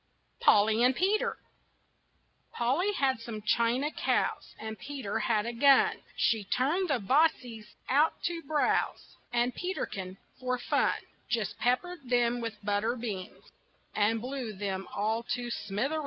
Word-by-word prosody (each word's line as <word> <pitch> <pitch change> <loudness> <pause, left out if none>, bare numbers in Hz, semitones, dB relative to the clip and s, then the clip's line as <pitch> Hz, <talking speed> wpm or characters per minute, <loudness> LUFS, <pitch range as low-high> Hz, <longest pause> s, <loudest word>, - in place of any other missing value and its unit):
POLLY 215 +2 +5
AND 250 +1 +4
PETER 430 +6 +1 1.2
Polly 275 +12 +1
had 265 - +1
some 225 -2 -7
china 235 +7 +2
cows - - -1
And 220 0 -6
Peter 270 -8 -4
had 215 -2 +1
a 235 - -3
gun. 285 - +5 0.2
She 225 -3 +2
turned 295 - 0
the 280 - +3
bossies 245 -2 +1
out 295 +4 +4
to 340 -1 -2
browse, 300 0 0 0.2
And 240 +1 +1
Peterkin, 195 - -4 0.2
for 255 0 -1
fun, 245 - +1 0.3
Just 225 -4 -1
peppered 255 +4 -1
them 240 -1 +2
with 220 -3 -6
butter 210 +3 +1
beans 210 -6 -6 0.4
And 215 +2 +2
blew 250 -2 -4
them 195 -1 -4
all 220 +3 0
to 240 -1 -5
smithereens. 235 +10 -2
240 Hz, 135 wpm, -30 LUFS, 215-280 Hz, 1.2 s, POLLY